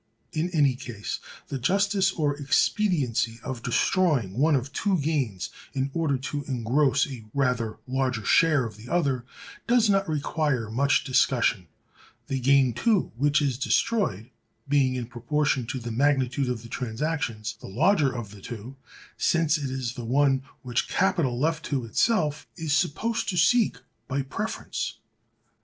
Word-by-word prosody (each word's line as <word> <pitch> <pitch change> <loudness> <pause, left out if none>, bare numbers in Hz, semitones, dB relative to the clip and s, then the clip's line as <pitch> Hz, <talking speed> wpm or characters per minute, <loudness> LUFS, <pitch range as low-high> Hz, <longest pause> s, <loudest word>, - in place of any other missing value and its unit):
In 160 +3 0
any 145 -6 +3
case, 120 -5 -6 0.3
the 135 - -3
justice 195 - +2
or 150 -5 0
expediency 140 - +1
of 130 -3 -5
destroying 130 - +1
one 150 +3 +3
of 135 +1 -2
two 195 +3 +1
gains, 135 - -1 0.2
in 135 +1 -1
order 160 -5 +1
to 145 +2 -4
engross 135 +2 +2
a 125 -6 -8
rather 125 -5 0
larger 130 -4 -1
share 155 -6 +4
of 110 -2 -8
the 110 +3 -12
other, 140 -8 0 0.4
does 235 -3 +4
not 195 -2 +1
require 145 -6 -1
much 140 +4 +2
discussion; 125 - +2 0.6
the 135 - -2
gain, 135 -1 +4
too, 200 - +1
which 145 +4 +2
is 130 -3 -1
destroyed, 140 - 0 0.4
being, 135 -2 +2
in 125 -2 -3
proportion 125 +2 -1
to 135 0 -3
the 120 -1 -5
magnitude 135 +1 +1
of 120 -2 -3
the - - -9
transactions, 115 -2 -3
the - - -8
larger 150 - +3
of 120 -5 -6
the 105 -2 -13
two, 120 +5 -8 0.4
since 165 -2 +2
it 140 -2 -3
is 130 -3 -3
the 125 -2 -7
one 135 +2 +2 0.2
which 125 -1 -1
capital, 160 -10 +1
left 160 +2 0
to 135 -5 -2
itself, 155 - +1
is 160 -3 -1
supposed 225 +10 0
to 180 - -2
seek 210 +7 +4 0.3
by 135 +1 -1
preference. 135 - -4
135 Hz, 150 wpm, -26 LUFS, 120-155 Hz, 0.6 s, share